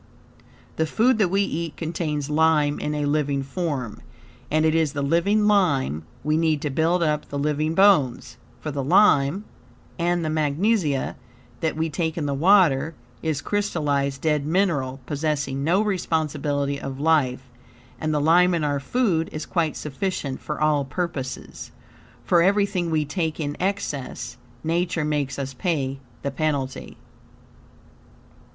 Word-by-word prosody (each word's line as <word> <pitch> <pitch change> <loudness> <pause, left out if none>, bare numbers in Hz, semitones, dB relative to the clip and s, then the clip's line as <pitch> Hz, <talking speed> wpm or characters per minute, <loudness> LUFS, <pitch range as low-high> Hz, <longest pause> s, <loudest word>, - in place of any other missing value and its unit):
The 160 - +1
food 230 +7 +2
that 195 -4 +3
we 195 +2 +2
eat 165 -3 -4
contains 155 -3 -2
lime 150 -1 +2
in 150 - -2
a 150 -1 -1
living 145 -2 0
form, 140 - -4 0.5
and 155 +1 +2
it 160 - +3
is 160 -3 +1
the 140 - -2
living 185 +8 +2
lime 140 - +2 0.2
we 150 +2 +1
need 160 -2 +2
to 150 - -1
build 165 +5 +2
up 150 -2 -1
the 145 - -4
living 150 +2 0
bones, 185 -11 +3 0.2
for 155 - -5
the 140 -1 -3
lime 170 +1 +4 0.5
and 175 0 +1
the - - -1
magnesia 155 0 0 0.4
that 160 -1 -1
we 160 +1 0
take 160 +1 -2
in 155 - -1
the 140 - -1
water 165 -2 +4 0.3
is 155 -3 -2
crystallized 145 -9 -1
dead 150 -2 +1
mineral, 150 -6 0
possessing 140 -1 -2
no 175 +7 +3
responsibility 150 -7 -1
of 135 0 -6
life, 140 -5 +1 0.5
and 155 - -1
the 150 - +1
lime 175 +4 +4
in 165 - -1
our 145 -1 0
food 170 - 0
is 155 - -5
quite 165 -4 -1
sufficient 150 -2 -3
for 150 - -5
all 150 -2 +2
purposes. 135 -3 -5 0.5
For 175 -2 +4
everything 195 -2 +2
we 155 -2 +1
take 160 +1 -2
in 145 -2 -2
excess, 165 -9 -3 0.3
Nature 165 -1 0
makes 145 -3 -1
us 135 -1 -4
pay 135 -2 -2 0.2
the 140 - -1
penalty. 140 -2 -3
155 Hz, 145 wpm, -24 LUFS, 140-170 Hz, 0.5 s, lime